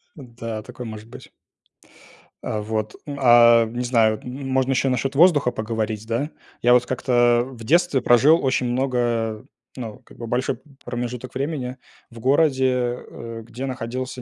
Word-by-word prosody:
Да, 115 -6 -7
такое 125 - -9
может 110 0 -9
быть. - - -12 1.1
А, 105 - -2
вот, 110 0 -3
а, 120 -4 +6
не 120 +2 -4
знаю, 110 -3 +2
можно 130 +1 -1
ещё 135 +1 +1
насчет 130 +2 -1
воздуха 150 -5 +5
поговорить, 110 -1 -3
да. 120 +7 -2 0.3
Я 120 +1 +5
вот 125 0 +4
как-то 120 -2 +2
в 120 -3 -11
детстве 165 +2 +2
прожил 135 +8 +5
очень 130 -1 +1
много, 120 -4 -1 0.3
ну, 115 -4 -7
как - - -17
бы, 115 - -7
большой 125 +1 -1
п - - -29 0.2
промежуток 120 +1 -5
времени 135 -3 -3 0.3
в 115 - -11
городе, 130 -3 +2
э, 115 -1 -8
где 120 +3 -6
находился 130 0 -5
125 Hz, 150 wpm, -22 LUFS, 115-130 Hz, 1.1 s, а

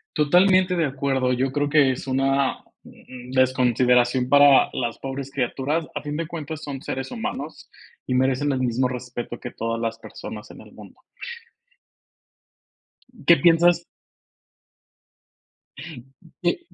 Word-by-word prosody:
Totalmente 180 +4 +4
de 165 -3 +1
acuerdo, 135 -2 -1
yo 130 +1 -1
creo 145 0 0
que 140 -3 +4
es 130 - -6
una, 135 0 0 0.2
mm, 125 0 -13
desconsideración 125 -1 +2
para 145 0 +6
las 120 -2 -3
pobres 135 0 -6
criaturas. 140 +4 -2
A - - -3
fin 150 +1 -5
de 165 - -3
cuentas, 155 -2 -6
son 140 -2 -6
seres 135 0 -5
humanos 225 - -6 0.4
y - - -2
merecen 130 +3 +1
el 130 - -1
mismo 125 0 0
respeto 125 -1 -6
que 125 - -7
todas 115 0 -3
las 115 -1 -3
personas - - -9
en - - -13
el - - -16
mundo. - - -15 2.2
¿Qué 170 - +7
piensas? 170 0 +4 2.6
¿Qué 175 - 0
135 Hz, 130 wpm, -23 LUFS, 125-150 Hz, 2.6 s, Qué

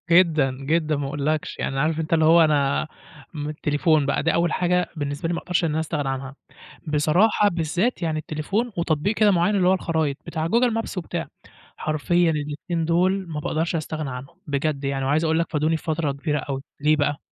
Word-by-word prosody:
جدًا، 165 -6 +4
جدًا، 155 +2 +1
ما 140 -1 -2
أقولكش، 145 +2 -2
يعني 135 - -2
عارف 155 +2 +1
أنت 160 0 -2
اللي 160 -1 +4
هو 165 +2 +7
أنا 145 -1 +1 0.5
م 150 -2 -4
التليفون 150 0 +1
بقى 140 - 0
دي 165 - +2
أول 170 0 +1
حاجة 180 -1 +1
بالنسبة 145 +1 -3
لي 170 - -1
ما 170 - -1
أقدرش 180 0 -1
إن - - 0
أنا 155 +1 0
أستغنى 150 -3 -2
عنها. 135 0 -5 0.5
بصراحة 175 +8 +3
بالذات 175 +7 -1
يعني 160 -2 -1
التليفون، 195 +11 -2
وتطبيق 170 +4 0
كده 210 -1 +4
معين 180 +3 +2
اللي 185 -2 +3
هو 185 - +5
الخرايط، 160 -6 -1
بتاع 160 -1 -2
google 235 +5 +2
maps 225 -3 -4
وبتاع، 175 - -3 0.5
حرفيًا 165 +3 +1
الاتنين 150 +3 -3
دُوُل 185 +3 +1
ما 155 -2 -4
باقدَرش 160 +3 -1
أستغنى 155 -2 -3
عنهم، 130 +4 -8
بجد 145 0 -1
يعني 135 -1 -1
وعايز 145 +4 +2
أقول 160 0 +2
لك 170 - -1
فادوني 155 +1 +1
في - - -15
فترة 155 -2 -1
كبيرة 150 +2 -2
أوي 135 -2 -4 0.2
ليه 150 +1 +4
بقى؟ 145 -1 0
155 Hz, 200 wpm, -23 LUFS, 145-170 Hz, 0.5 s, هو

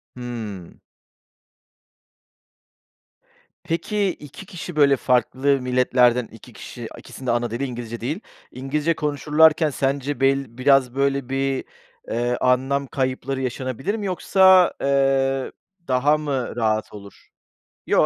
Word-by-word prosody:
Hımm. 110 -7 -7 2.8
Peki, 195 +4 -1
2 155 +3 -9
kişi, 175 -1 -8
böyle, 140 -2 +5
farklı 130 +2 +1
milletlerden 125 -1 +2
2 115 - -15
kişi - - -9
ikisininde 130 -3 -5
ana 120 -1 -1
dili 120 +4 -3
İngilizce 120 -2 -6
değil, 145 - -3 0.3
İngilizce 145 +6 -1
konuşurlarken 150 +1 +3
sence 140 0 -2
bel 135 -3 0
biraz, 130 -1 +3
böyle, 140 -1 0
bir, 135 0 -1 0.4
eee, 120 +1 -1
anlam 135 +2 +1
kayıpları 130 0 -2
yaşanabilir 130 - -3
mi 210 -2 -4
yoksa, 190 0 +4
eee, 135 -1 +1 0.4
daha 140 +4 +3
mı 140 -5 -3
rahat 110 -3 -1
olur? 100 -2 -13 0.6
Yo, - - +4
135 Hz, 110 wpm, -22 LUFS, 125-145 Hz, 2.8 s, böyle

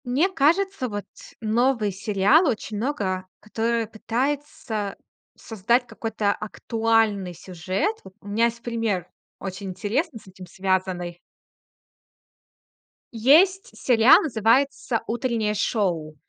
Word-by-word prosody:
Мне 270 +10 +2
кажется, 365 -2 +1
вот 205 -2 -5 0.4
новый 230 -1 +1
сериал 205 - +3
очень 220 -4 -2
много, 200 -7 -2
который 230 +2 -1
пытается 230 -2 -3 0.4
создать 235 +4 0
какой-то 220 -4 -2
актуальный 220 -4 0
сюжет. 185 - -2
Вот 190 - -14
у 205 - -15
меня 215 +3 +2
есть 235 0 -3
пример, 225 -7 -2 0.3
очень 195 +1 -6
интересный, 225 - -2
с - - -21
этим 185 -1 -12
связанный. 185 -2 -2 2.0
Есть 325 - +4
сериал, 235 0 +6
называется 255 -1 +1
"Утреннее 230 -3 -1
шоу". 180 -8 -1
225 Hz, 105 wpm, -24 LUFS, 195-250 Hz, 2.0 s, сериал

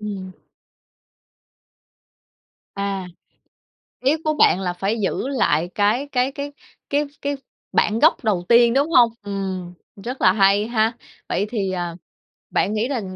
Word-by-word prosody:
Ừm. 200 -3 -5 2.4
À, 195 -2 -3 0.9
ý 270 +4 +2
của 310 - +1
bạn 245 - +4
là 180 -2 -2
phải 195 +5 -2
giữ 200 +6 -1
lại 235 - +1
cái 215 +7 +1
cái 255 +1 +1
cái 285 +1 -6 0.4
cái 290 +1 +1 0.2
cái 285 0 -1 0.4
bản 215 +2 +2
gốc 315 +1 +4
đầu 195 -6 0
tiên, 235 0 +6
đúng 280 +4 +2
hông? 240 -6 +6
Ừm, 190 -3 -4 0.3
rất 250 +4 -5
là 185 - +6
hay 200 +1 +3
ha! 225 0 +1 0.3
Vậy 200 - 0
thì, 205 -5 -2
à, 175 -2 -3 0.6
bạn 205 - +1
nghĩ 215 +2 0
là 265 -4 -2
215 Hz, 140 wpm, -21 LUFS, 195-255 Hz, 2.4 s, tiên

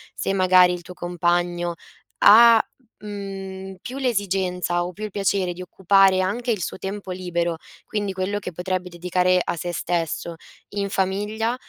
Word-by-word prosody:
Se 195 - -1
magari 185 -1 +5
il 175 - -5
tuo 180 +1 -11
compagno 175 0 -1 0.4
ha, 230 +2 +8 0.4
mhmm, 195 -2 -7
più 255 +2 -7
l'esigenza 190 -7 0
o 175 - -4
più 210 - -9
il 215 - -4
piacere 195 -2 0
di 180 - -9
occupare 190 +1 +3
anche 225 +7 -2
il 210 -6 0
suo - - -4
tempo 195 0 -5
libero, 175 -2 -2 0.3
quindi 205 -2 -3
quello 190 +2 -2
che 185 - -6
potrebbe 180 +1 -3
dedicare 180 +1 +1
a - - -2
se 175 +1 -4
stesso, 170 -1 -2 0.3
in 200 -1 -3
famiglia, 210 +5 -1
185 Hz, 155 wpm, -23 LUFS, 180-200 Hz, 0.4 s, ha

